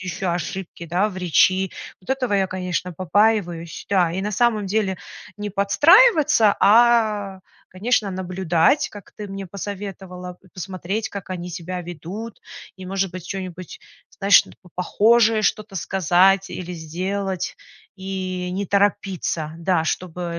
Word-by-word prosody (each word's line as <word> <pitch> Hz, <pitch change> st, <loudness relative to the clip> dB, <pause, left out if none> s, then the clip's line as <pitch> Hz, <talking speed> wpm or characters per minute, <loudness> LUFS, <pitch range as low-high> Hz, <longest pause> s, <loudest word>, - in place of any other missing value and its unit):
ещё 185 Hz, 0 st, -3 dB
ошибки, 170 Hz, +1 st, -5 dB
да, 180 Hz, +6 st, +1 dB
в 185 Hz, -, -7 dB
речи. 185 Hz, +2 st, +3 dB, 0.3 s
Вот 180 Hz, -, -22 dB
этого 260 Hz, -4 st, -1 dB
я, 195 Hz, -1 st, +2 dB
конечно, 180 Hz, -1 st, -3 dB
побаиваюсь. 185 Hz, -2 st, 0 dB
Да, 180 Hz, -4 st, +3 dB
и 185 Hz, +3 st, -3 dB
на 210 Hz, +1 st, -2 dB
самом 220 Hz, -1 st, +2 dB
деле 195 Hz, -1 st, 0 dB, 0.4 s
не 210 Hz, 0 st, -5 dB
подстраиваться, 295 Hz, -, +5 dB
а, 215 Hz, -3 st, +4 dB, 0.3 s
конечно, 210 Hz, +3 st, 0 dB
наблюдать, 185 Hz, -, +1 dB
как 205 Hz, -3 st, -12 dB
ты 210 Hz, -, -6 dB
мне 195 Hz, 0 st, -6 dB
посоветовала, 190 Hz, -2 st, -7 dB
п 185 Hz, +1 st, -24 dB
посмотреть, 190 Hz, +4 st, -4 dB
как 200 Hz, -3 st, -8 dB
они 180 Hz, -1 st, -5 dB
себя 180 Hz, +1 st, -5 dB
ведут, 175 Hz, +6 st, -8 dB, 0.4 s
и, 185 Hz, -1 st, -9 dB
может 195 Hz, 0 st, -1 dB
быть, 185 Hz, -2 st, -8 dB
чё-нибудь, 185 Hz, -3 st, -7 dB, 0.3 s
знаешь, 200 Hz, 0 st, +5 dB
ну -, -, -14 dB
по 180 Hz, -, -17 dB
похожее 220 Hz, +4 st, +3 dB
что-то 210 Hz, 0 st, -1 dB
сказать 190 Hz, +1 st, +3 dB
или 180 Hz, -1 st, -6 dB
сделать 185 Hz, +3 st, -3 dB, 0.4 s
и 185 Hz, -1 st, -4 dB
не 195 Hz, +2 st, -2 dB
торопиться, 195 Hz, -5 st, 0 dB
да, 170 Hz, -1 st, +1 dB
чтобы, 175 Hz, +1 st, -3 dB
э, -, -, -4 dB
190 Hz, 140 wpm, -22 LUFS, 180-205 Hz, 0.4 s, подстраиваться